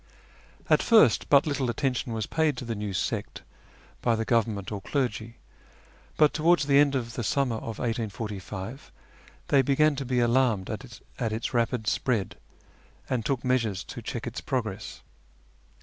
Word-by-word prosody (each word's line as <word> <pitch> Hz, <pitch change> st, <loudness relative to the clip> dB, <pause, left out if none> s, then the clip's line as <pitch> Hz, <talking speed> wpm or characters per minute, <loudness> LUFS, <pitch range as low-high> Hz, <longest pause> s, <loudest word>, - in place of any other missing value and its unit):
At -, -, +4 dB
first 215 Hz, -, +5 dB
but 140 Hz, -1 st, +6 dB
little 140 Hz, -4 st, -1 dB
attention 125 Hz, 0 st, -1 dB
M^as 110 Hz, -1 st, -2 dB
paid 160 Hz, -4 st, +1 dB
to 125 Hz, -, -5 dB
the 115 Hz, -, -2 dB
new 105 Hz, -1 st, -4 dB
sect 95 Hz, -, -3 dB, 0.6 s
by 120 Hz, -2 st, +2 dB
the 110 Hz, 0 st, -2 dB
government 110 Hz, -4 st, 0 dB
or 100 Hz, -2 st, -4 dB
clergy, 115 Hz, -3 st, -2 dB, 0.8 s
but 150 Hz, -1 st, +5 dB
towards 165 Hz, 0 st, +3 dB
the 140 Hz, 0 st, +5 dB
end 145 Hz, -1 st, +4 dB
of 120 Hz, -3 st, -2 dB
tlie 115 Hz, +1 st, -4 dB
summer 125 Hz, +2 st, 0 dB
of 110 Hz, 0 st, -6 dB
1845 110 Hz, -1 st, -5 dB, 0.6 s
they 140 Hz, -, +5 dB
began 145 Hz, +3 st, +3 dB
to 140 Hz, -, -2 dB
be 125 Hz, -1 st, 0 dB
alarmed 120 Hz, -5 st, +2 dB
at 115 Hz, -2 st, -6 dB
its 110 Hz, +4 st, -3 dB
rapid 120 Hz, -1 st, 0 dB
spread, 110 Hz, -4 st, 0 dB, 0.8 s
and 125 Hz, -3 st, 0 dB
took 130 Hz, 0 st, -2 dB
measures 115 Hz, -6 st, 0 dB
to 120 Hz, -, -8 dB
check 115 Hz, +1 st, -5 dB
its 120 Hz, 0 st, -5 dB
progress. 110 Hz, -6 st, -4 dB
120 Hz, 155 wpm, -27 LUFS, 110-135 Hz, 0.8 s, but